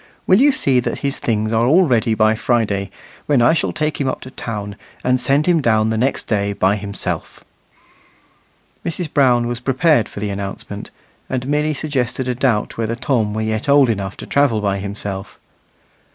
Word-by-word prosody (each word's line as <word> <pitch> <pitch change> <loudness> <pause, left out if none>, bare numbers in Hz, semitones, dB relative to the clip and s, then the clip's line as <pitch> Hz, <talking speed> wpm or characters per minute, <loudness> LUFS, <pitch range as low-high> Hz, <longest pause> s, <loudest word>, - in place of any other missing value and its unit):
Will 190 +6 +5
you 290 +1 +6
see 135 - +2
that 125 - -2
his 140 - 0
things 110 -1 -1
are 115 +2 +2
all 175 +7 +5
ready 115 -3 +2
by 110 0 +3
Friday, 110 -4 0 0.4
when 145 -3 +3
I 120 +5 +5
shall 165 - 0
take 155 -1 -2
him 135 - 0
up 130 - -2
to 130 - -10
town, 105 -5 -5 0.3
and 125 0 +1
send 140 +4 +2
him 175 -3 +3
down 110 -3 +2
the - - 0
next 130 +5 0
day 100 -2 -1
by 95 +1 +2
himself." 100 -1 -5 1.4
Mrs. 165 -1 -4
Brown 125 -4 +3
was 120 0 -3
prepared 135 0 +2
for - - -8
the 105 0 -3
announcement, 100 0 -6 0.4
and 130 0 -3
merely 150 +1 0
suggested 130 -3 -2
a 125 - 0
doubt 120 -4 0
whether 115 0 -1
Tom 120 -4 0
were 110 - -1
yet 110 +4 -2
old 140 -4 +5
enough 100 -3 -4
to - - -8
travel 140 -6 +2
by 100 -1 -1
himself. 100 -1 -6
120 Hz, 185 wpm, -19 LUFS, 105-140 Hz, 1.4 s, you